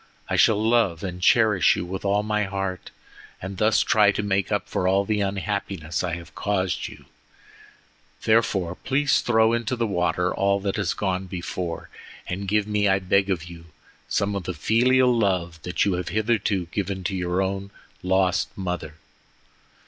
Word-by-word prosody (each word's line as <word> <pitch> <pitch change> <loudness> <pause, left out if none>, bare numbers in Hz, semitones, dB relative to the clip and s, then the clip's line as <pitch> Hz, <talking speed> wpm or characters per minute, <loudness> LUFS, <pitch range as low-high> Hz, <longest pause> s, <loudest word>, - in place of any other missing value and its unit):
I - - +2
shall 105 -2 +4
love 110 -7 +2
and 90 -1 -5
cherish 105 -3 +4
you - - -3
with 95 +2 -5
all 100 +1 +1
my 105 -1 0
heart, 95 -2 -4 0.5
and 95 0 -7
thus 110 +1 +3
try 105 -1 +4
to 105 - -2
make 100 -2 0
up - - -1
for 90 - -1
all 100 +1 +2
the 105 -1 0
unhappiness 95 -5 -2
I 85 -1 -1
have 85 -1 -11
caused 95 -3 -1
you. - - -13 1.2
Therefore, 105 -6 +2
please 135 +8 +1
throw 110 -1 +3
into 115 +1 -1
the 115 -1 0
water 90 -3 0
all 100 0 +1
that 100 +1 -2
has 100 -4 -1
gone 95 -1 -2
before, 85 -1 -5 0.4
and 95 +2 -4
give 105 +1 +2
me, 105 -1 +1
I 95 - +4
beg 100 +1 +1
of 90 -4 -1
you, 85 -1 -11 0.4
some 100 +1 0
of 95 -3 -4
the 90 - -4
filial 125 +8 +3
love 90 -7 0
that 90 +2 0
you 100 - +1
have 90 -1 -3
hitherto 105 -4 0
given 95 -2 -3
to 95 +2 -2
your 90 0 -1
own 95 +1 -3 0.3
lost 95 0 +1
mother." 90 -5 -4
95 Hz, 170 wpm, -24 LUFS, 90-105 Hz, 1.2 s, shall